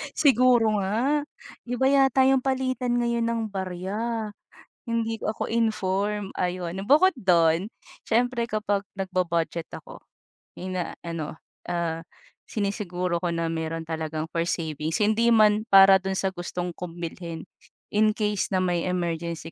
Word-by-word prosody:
Siguro 245 -6 +4
nga, 250 +10 0 0.4
iba 245 +2 0
yata 270 -1 +4
'yong 265 -1 +3
palitan 255 -2 0
ngayon 235 -1 0
ng 230 0 0
barya; 205 +4 -3 0.6
hindi 225 -1 -1
ako 215 - -3
informed, 210 -3 0
ayon. 180 +1 -2
Bukod 310 - +6
don, 175 -4 +3 0.4
siyempre 240 +1 +1
kapag 205 -2 -1
nagbu-budget 175 -3 -1
ako, - - -10 0.6
ina-ano, 170 -3 -5 0.3
ah, 170 -2 -1 0.5
sinisiguro 180 -4 -2
ko 175 - -1
na 165 0 -1
meron 160 0 -3
talagang 160 -1 -3
for 165 0 0
savings, 160 -2 -2
hindi 220 +3 +3
man 215 -2 +5
para 195 0 +8
do'n 190 0 -2
sa 190 0 0
gustong 175 0 -4
kong 175 0 -8
bilhin, 170 -1 -6 0.5
in 215 +1 +4
case 210 -2 -1
na 190 - +1
may 175 -1 0
emergency 170 -2 -3
195 Hz, 125 wpm, -25 LUFS, 170-230 Hz, 0.6 s, para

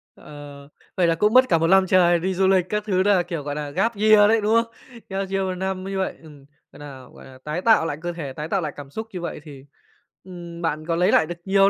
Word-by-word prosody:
Ờ, 145 -1 -12 0.3
vậy 175 -2 +3
là 165 - +2
cũng 210 +5 +1
mất 255 0 +5
cả 165 - +4
1 165 - +1
lăm 190 +1 +4
trời 175 -2 +4
đi 190 +2 -2
du 190 +1 +1
lịch 190 -2 +3
các 210 0 -2
thứ 185 -1 +1
đà, 195 -3 +3
kiểu, 170 -4 -6
gọi 145 0 -5
là, 150 -1 -5
gap 195 +9 -1
year 210 0 +5
đấy, 225 0 +3
đúng 210 +2 +1
hông? 230 - +3 0.4
Gap 195 0 -4
year 195 0 -1
1 185 -1 -3
năm 190 0 -4
như 195 0 -5
vậy, 190 - -2
ừm, 145 -3 -15 0.3
gọi - - -16
nà 135 -3 -11
gọi - - -14
nà, 130 -1 -14
tái 155 +4 -4
tạo 220 -5 +4
lại 145 -3 -3
cơ 175 0 -4
thể, 150 -6 -7
tái 150 +3 -6
tạo 195 - 0
lại 150 -3 -4
cảm 145 -1 -10
xúc 220 +10 -7
như 180 - -5
vậy 170 - -5
thì, 140 -4 -13 0.6
ừm, 175 -2 -10
bạn 155 -2 -3
có 165 - 0
lấy 180 +2 +2
lại - - +4
được 175 +2 -6
nhiều 195 0 +4
175 Hz, 275 wpm, -22 LUFS, 155-195 Hz, 0.6 s, mất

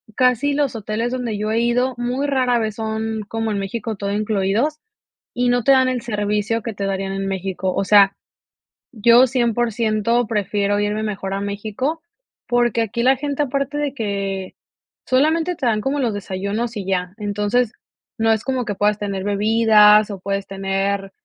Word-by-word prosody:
casi 255 +3 +2
los 280 -3 0
hoteles 220 +3 -2
donde 245 -4 -3
yo 215 +1 -2
he 225 - +1
ido 245 +2 +1
muy 245 +3 -2
rara 255 -3 +2
vez 220 -2 -2
son 220 0 -3
como 225 0 -2
en 205 - -1
México 215 +2 -4
todo 200 0 -3
incluidos 215 +8 0 0.5
y 245 0 0
no 245 0 +2
te 250 - +2
dan 260 -1 +5
el 255 -2 -2
servicio 210 0 -1
que 230 0 -5
te 200 - -4
darían 195 0 -2
en 195 0 -3
México. 190 -1 -2
O - - 0
sea, 200 0 +6 0.8
yo 235 +2 +5
100% 235 -1 +1
prefiero 205 -1 0
irme 210 +1 -1
mejor 195 -2 -3
a 195 - -2
México, 215 +10 -3 0.5
porque, 240 -1 +2
aquí 235 +2 -2
la 265 +1 +4
gente 285 +1 -1
aparte 275 +1 -2
de 295 -2 -1
que 200 -5 -3 0.5
solamente 320 +6 +2
te 275 - -4
dan 220 -3 +1
como 275 +5 -1
los 240 -5 0
desayunos 205 +4 -3
y 200 - -4
ya. 180 -1 -1
Entonces, 210 +3 0 0.4
no 225 0 +2
es 220 -1 +1
como 260 -1 -1
que 210 - -2
puedas 205 +1 +1
tener 200 -2 -3
bebidas 210 0 +5
o 195 - -6
puedes 195 0 -3
tener 195 0 -2
220 Hz, 175 wpm, -20 LUFS, 200-245 Hz, 0.8 s, sea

